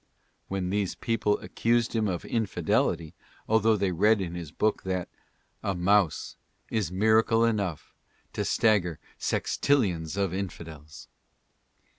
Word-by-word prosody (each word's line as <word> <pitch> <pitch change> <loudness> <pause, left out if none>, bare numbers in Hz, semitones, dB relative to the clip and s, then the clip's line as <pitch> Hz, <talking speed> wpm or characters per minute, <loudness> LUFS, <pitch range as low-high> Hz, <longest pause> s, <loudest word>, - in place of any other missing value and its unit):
Then 95 -2 -2
these 100 -3 -1
people 110 -3 0
accused 115 0 0
him 110 -1 +1
of 90 -3 -3
infidelity, 100 -7 0 0.3
although 110 0 +3
they 100 -2 0
read 105 +5 +3
in 90 -3 -3
his 85 -4 -6
book 110 +6 0
that 95 -2 -3 0.5
"A 100 - -1
mouse 95 -1 +1 0.3
is 105 -7 -1
miracle 110 +4 +3
enough 100 -8 -2 0.4
to - - -1
stagger 95 -8 +2 0.2
sextillions 90 - 0
of 100 -3 0
infidels." 80 -6 -7
100 Hz, 120 wpm, -27 LUFS, 90-110 Hz, 0.5 s, although